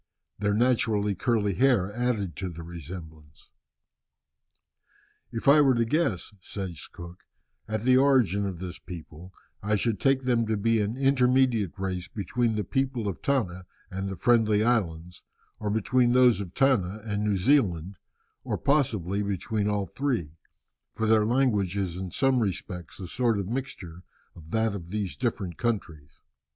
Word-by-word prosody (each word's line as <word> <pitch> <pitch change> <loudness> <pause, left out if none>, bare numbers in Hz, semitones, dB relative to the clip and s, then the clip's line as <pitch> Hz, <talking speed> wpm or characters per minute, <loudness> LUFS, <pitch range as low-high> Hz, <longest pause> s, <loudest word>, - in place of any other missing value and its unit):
Their 105 0 +1
naturally 110 -3 +2
curly 105 +1 0
hair 110 -5 +2
added 110 - -1
to 95 -1 -3
the 85 -1 -8
resemblance. 80 -3 -10 1.8
"If 115 - -5
I 145 +2 +8
were 135 -3 +4
to 115 0 +2
guess," 115 - -1
says 95 -5 -6
Cook, 85 +1 -11 0.5
"at 110 -1 -2
the 130 +2 +4
origin 125 -8 +3
of 95 -3 -5
this 90 0 -7
people, 85 +1 -10 0.3
I 105 +1 +1
should 105 0 0
take 135 +3 +2
them 120 -3 +1
to 110 -1 0
be 115 +2 +2
an 105 +4 -2
intermediate 130 - +2
race 95 -2 -3
between 110 +3 -1
the 105 - -1
people 130 +1 -1
of 95 -5 -4
Tanna 95 -10 -1 0.2
and 95 +1 -3
the 95 - -4
Friendly 110 +1 +3
Islands, 90 -8 -1 0.4
or 105 - -2
between 120 +3 +2
those 125 -4 +5
of 90 -3 -8
Tanna 110 -7 +1
and 105 -1 -2
New 105 -2 +1
Zealand, 95 - +2 0.5
or - - -2
possibly 110 - +1
between 100 +2 -1
all 100 -1 0
three, 120 - -2 0.6
for 110 - -2
their 110 -1 +4
language 110 -7 +1
is 95 -4 -2
in 95 0 -5
some 135 +6 +2
respects 90 -5 -4
a 95 - -6
sort 115 +3 +1
of 100 -2 -3
mixture 100 -8 -5 0.3
of 80 -2 -13
that 110 +2 +1
of 85 -4 -7
these 100 -2 -3
different 100 -9 -3
countries." 85 - -2
105 Hz, 155 wpm, -27 LUFS, 90-120 Hz, 1.8 s, I